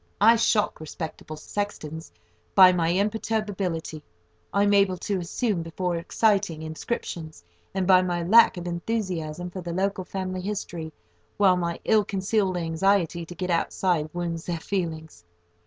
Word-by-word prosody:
I 225 +3 +7
shock 220 -2 +1
respectable 155 0 -7
sextons 160 -3 -5 0.4
by 185 -2 +9
the 175 0 +1
imperturbability 200 -6 -2 0.5
I 200 +1 +2
am 205 0 +3
able 195 -2 +3
to 195 +1 -2
assume 185 +2 -1
before 175 +2 -2
exciting 190 -2 +1
inscriptions, 160 - -5 0.3
and 190 -1 0
by 185 0 +6
my 175 -2 -1
lack 220 +3 +6
of 175 - -5
enthusiasm 175 -3 -3
for 185 - -6
the 170 -1 -5
local 195 +1 -1
family 185 0 -4
history, 175 -5 -4 0.5
while 195 -3 +5
my 170 -1 -2
ill 215 -1 +4
concealed 195 -1 0
anxiety 170 0 +1
to 175 - -9
get 180 +1 -3
outside 170 -2 0
wounds 170 -1 -4
their 175 -1 -1
feelings. 160 - -4
180 Hz, 140 wpm, -25 LUFS, 165-200 Hz, 0.5 s, by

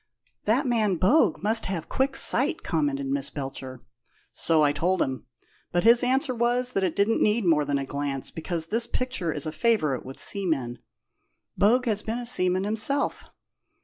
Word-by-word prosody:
"The 235 +7 +2
man 225 -7 +1
Bogue 195 - +2
must 220 +2 +2
have 180 -4 -4
quick 270 +1 -1
sight," 280 +4 +3
commented 145 -5 -1
Miss 140 +1 -3
Belcher. 135 -3 -7 0.5
"So 160 -2 +2
I 145 - +3
told 175 +6 -1
him, 130 -3 -3 0.4
but 175 0 0
his 235 +2 +6
answer 260 +2 +1
was 245 +1 0
that 195 - 0
it 180 -4 -1
didn't 205 +3 +1
need 210 0 +1
more 155 -4 +2
than 145 0 -1
a 135 - -3
glance, 140 -1 -4
because 165 0 -4
this 230 +6 -1
picture 250 -9 -2
is 145 -2 -2
a 155 - -3
favourite 160 - 0
with 135 +1 -10
seamen. 155 -12 -2 0.8
Bogue 245 +5 +3
has 210 -3 0
been 225 +2 -4
a 245 - -5
seaman 185 -5 +3
himself." 220 +7 -1
190 Hz, 175 wpm, -25 LUFS, 145-235 Hz, 0.8 s, his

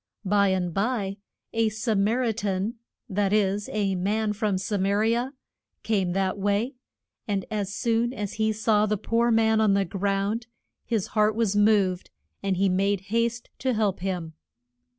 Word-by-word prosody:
By 200 +1 +3
and 185 -2 0
by 200 -1 -1 0.4
a 225 -1 +2
Sa 220 +1 -1
mar 215 +5 +2
i 235 - +2
tan 205 0 -2 0.3
that 200 -2 0
is, 205 -1 +1
a 200 -2 0
man 210 +4 0
from 210 -2 0
Sa 200 +2 -2
ma 190 +1 +1
ri 220 +3 +2
a 245 +3 -1 0.5
came 195 -5 0
that 195 +1 0
way, 205 +6 0 0.5
and 200 -3 -1
as 205 -2 -2
soon 235 0 +1
as 210 -6 -4
he 220 0 +3
saw 215 -1 +2
the 210 0 0
poor 230 +4 +1
man 220 -1 +3
on 205 -2 +4
the 200 0 +2
ground 200 +4 -1 0.4
his 220 -5 0
heart 215 0 +3
was 220 -3 +1
moved, 205 -3 +3 0.3
and 195 -2 0
he 195 +1 +3
made 195 +1 +1
haste 235 +1 0
to 260 -2 0
help 210 -3 0
him. 180 -3 -3
205 Hz, 170 wpm, -26 LUFS, 195-220 Hz, 0.5 s, on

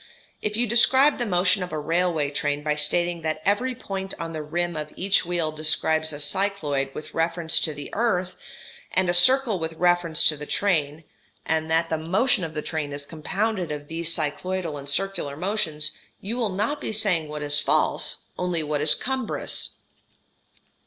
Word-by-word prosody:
If 210 0 -2
you 240 - +3
describe 260 +5 +4
the 240 - -1
motion 180 +1 +3
of 180 - -4
a 155 - -3
railway 160 -1 0
train 145 0 -1
by 150 0 +1
stating 170 +3 +1
that 155 -1 -2
every 245 +6 +1
point 195 -4 -5
on 165 0 -5
the 155 - -4
rim 175 +3 -2
of 150 0 -5
each 195 -1 +2
wheel 170 -3 0
describes 155 0 +1
a 145 - -6
cycloid 145 -5 0
with 155 - -7
reference 165 0 +2
to 155 - -1
the 145 - -8
earth, 185 -5 0 0.6
and 185 -1 +2
a - - -2
circle 235 +2 +5
with 160 0 -3
reference 175 -1 +3
to 155 - 0
the 150 0 -8
train, 160 -6 0 0.4
and 160 0 0
that 165 +1 +1
the 160 - 0
motion 190 +7 +1
of 160 -1 -5
the 150 - -3
train 155 -3 -3
is 145 0 -5
compounded 185 +4 -2
of 145 -1 -6
these 165 0 -1
cycloidal 165 +2 -2
and 140 -1 -7
circular 145 -3 -2
motions, 165 -5 0 0.3
you 210 +5 -4
will 235 -4 0
not 210 +10 -2
be - - -3
saying 195 -7 +2
what 150 0 -5
is 145 0 +1
false, - - +1 0.2
only 180 -3 -1
what 150 -1 -1
is 150 0 +5
cumbrous. 260 -2 -2
170 Hz, 180 wpm, -25 LUFS, 155-195 Hz, 0.6 s, circle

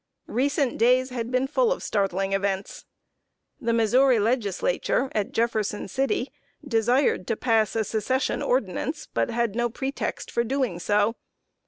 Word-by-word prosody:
Recent 275 +2 0
days 255 +3 +3
had 235 -2 -3
been 255 +1 +1
full 480 - +1
of - - -2
startling 195 -1 0
events. 195 0 -2 0.7
The 235 -4 -1
Missouri 240 +3 +4
Legislature, 235 - 0
at 210 -2 -1
Jefferson 220 -3 -1
City, 265 +3 -1 0.4
desired 240 -3 +2
to 225 - 0
pass 225 -3 +1
a 225 - +2
Secession 230 +5 -1
ordinance, 255 - -1
but - - 0
had 235 -2 -1
no 240 0 +1
pretext 265 +4 -4
for 235 - +1
doing 250 -7 -1
so. 210 +4 +1
235 Hz, 140 wpm, -25 LUFS, 210-260 Hz, 0.7 s, Missouri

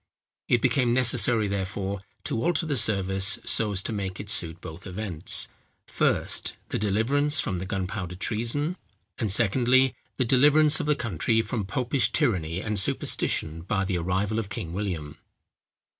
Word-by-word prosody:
It 120 - +2
became 125 -2 +2
necessary, 120 -3 +4
therefore, 100 0 -3 0.2
to 115 - -2
alter 175 -1 +1
the 150 -3 -1
service 95 -2 +3
so 110 -2 +3
as 95 -1 -1
to 115 - -3
make 95 -3 -4
it 105 0 -3
suit 85 -3 -1
both 80 +5 -10
events; 95 -4 -1 0.4
first, - - -1
the - - -2
deliverance 135 +9 +1
from 95 -7 -1
the 95 - -6
gunpowder 95 -2 -4
treason; 120 - -1 0.4
and 110 - -1
secondly, 125 +5 +3 0.2
the 130 - +1
deliverance 150 +5 +5
of 160 - -3
the 150 - +3
country 115 - 0
from 110 -5 -3
popish 130 +3 0
tyranny 85 -5 0
and 105 -1 -2
superstition 80 -3 +1
by 95 +3 -1
the 90 -2 -1
arrival 95 +5 -1
of 105 -3 -5
King 85 -3 -6
William. 85 -7 -4
105 Hz, 155 wpm, -26 LUFS, 95-125 Hz, 0.4 s, deliverance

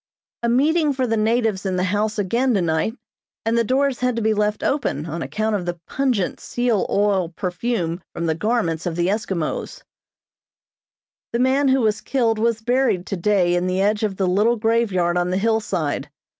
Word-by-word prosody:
A 235 - 0
meeting 295 +5 +3
for 260 -1 0
the 225 -2 0
natives 220 -2 +1
in 190 -2 -1
the 180 - 0
house 210 +3 0
again 235 +5 +1
tonight, 175 +5 0 0.5
and 225 +1 +1
the 235 - +3
doors 265 +2 +1
had 250 -1 0
to 230 - -1
be 220 0 +3
left 210 0 0
open 275 - -1
on 165 +1 -5
account 215 +3 -1
of 180 -3 -3
the 175 -1 -3
pungent 255 -9 -1
seal 240 -5 0
oil 200 -4 +1
perfume 180 0 -2
from 170 - -4
the 160 - +1
garments 180 -3 -1
of 170 - -2
the 175 +1 +1
Eskimos. 195 -6 -3 1.5
The - - +1
man 265 +3 +2
who 265 0 +3
was 215 -1 +1
killed 230 -5 0
was 230 0 +1
buried 245 -6 +1
today 190 -2 +1
in 175 +1 +1
the 185 +1 0
edge 205 +2 +2
of 205 -3 -1
the 195 - +1
little 205 +6 +3
graveyard 210 -6 +1
on 175 0 0
the 185 - 0
hillside. 195 -8 -1
215 Hz, 185 wpm, -22 LUFS, 180-235 Hz, 1.5 s, meeting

